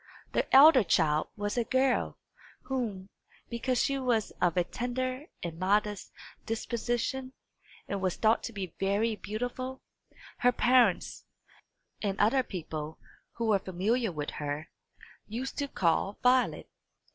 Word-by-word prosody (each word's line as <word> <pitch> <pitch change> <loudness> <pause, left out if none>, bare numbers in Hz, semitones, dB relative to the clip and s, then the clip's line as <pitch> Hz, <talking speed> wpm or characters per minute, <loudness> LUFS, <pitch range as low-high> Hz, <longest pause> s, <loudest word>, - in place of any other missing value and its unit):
The - - 0
elder 270 -2 +9
child 155 -4 +2
was 205 +3 -1
a - - +2
girl, 260 +2 +1 0.5
whom, 215 -8 -3 0.4
because 240 +1 0
she 275 0 0
was 240 -5 0
of 175 -1 +2
a 180 - +4
tender 255 - -3 0.2
and 165 -1 -5
modest 205 +1 0 0.3
disposition, 240 +3 -2 0.5
and 200 -1 -3
was 185 -2 0
thought 220 0 +3
to - - -5
be 195 -5 -6
very 205 +3 +1
beautiful, 245 +5 -5 0.6
her 245 - +4
parents, 245 -5 +2 0.8
and 200 -2 -2
other 225 +6 +4
people 160 -7 -6 0.4
who 235 - -3
were 210 -3 +3
familiar 200 +5 0
with 150 -3 -4
her, 150 +2 -5 0.6
used 245 +7 -5
to 285 - -1
call 190 -2 0
Violet. 250 0 +3
220 Hz, 130 wpm, -30 LUFS, 185-250 Hz, 0.8 s, elder